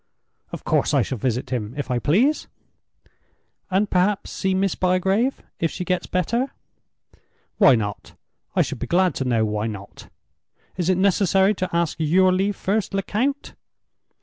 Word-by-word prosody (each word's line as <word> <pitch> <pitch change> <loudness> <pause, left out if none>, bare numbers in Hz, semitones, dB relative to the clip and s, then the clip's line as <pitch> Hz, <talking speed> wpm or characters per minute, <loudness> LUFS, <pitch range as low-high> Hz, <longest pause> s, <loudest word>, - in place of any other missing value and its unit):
"Of - - -7
course - - +1
I - - +4
shall 130 - -4
visit 125 +2 -2
him—if 125 +4 -3
I 125 - +1
please." 230 - +2 1.2
"And 195 +2 +2
perhaps 190 +2 0
see 190 -1 -1
Miss 195 0 +1
Bygrave, 190 +7 +1 0.2
if 165 - +1
she 180 - -5
gets 180 0 -1
better?" 235 +9 -1 1.1
"Why 135 - +7
not? 105 -3 -4 0.4
I - - +4
should - - -6
be - - -4
glad 185 +1 +2
to 135 - -3
know 115 -3 +2
why 105 +1 -2
not? 100 -2 -9 0.7
Is 180 -1 -1
it 185 - +3
necessary 195 +1 +3
to 185 -2 -3
ask 170 -2 0
your 185 +4 +4
leave 195 +2 0
first, 200 +1 -1
Lecount?" 230 +8 -1
185 Hz, 150 wpm, -23 LUFS, 135-195 Hz, 1.2 s, Why